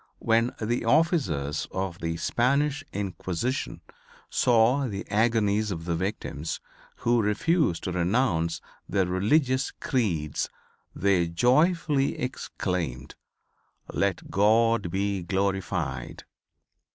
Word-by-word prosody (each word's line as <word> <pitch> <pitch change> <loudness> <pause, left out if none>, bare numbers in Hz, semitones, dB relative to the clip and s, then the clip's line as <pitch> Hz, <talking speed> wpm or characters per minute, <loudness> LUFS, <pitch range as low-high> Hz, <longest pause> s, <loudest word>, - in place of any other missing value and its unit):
When 115 +1 +1
the 115 +2 -1
officers 115 - +1
of 95 -2 -4
the 85 0 -2
Spanish 140 - +1
Inquisition 100 +4 -3 0.5
saw 125 +3 +3
the 100 -3 -5
agonies 110 -1 +2
of 80 -4 -4
the 85 -1 0
victims 85 -4 -3 0.4
who 120 0 +2
refused 110 - +1
to 90 - -2
renounce 85 -3 +1 0.3
their 95 -1 +2
religious 130 - +2
creeds 85 - -1 0.5
they 95 -3 +2
joyfully 140 - +2
exclaimed, 90 - -3 0.8
"Let - - -1
God 110 0 +3
be 100 +1 -1
glorified." 90 -8 -2
100 Hz, 95 wpm, -27 LUFS, 90-125 Hz, 0.8 s, saw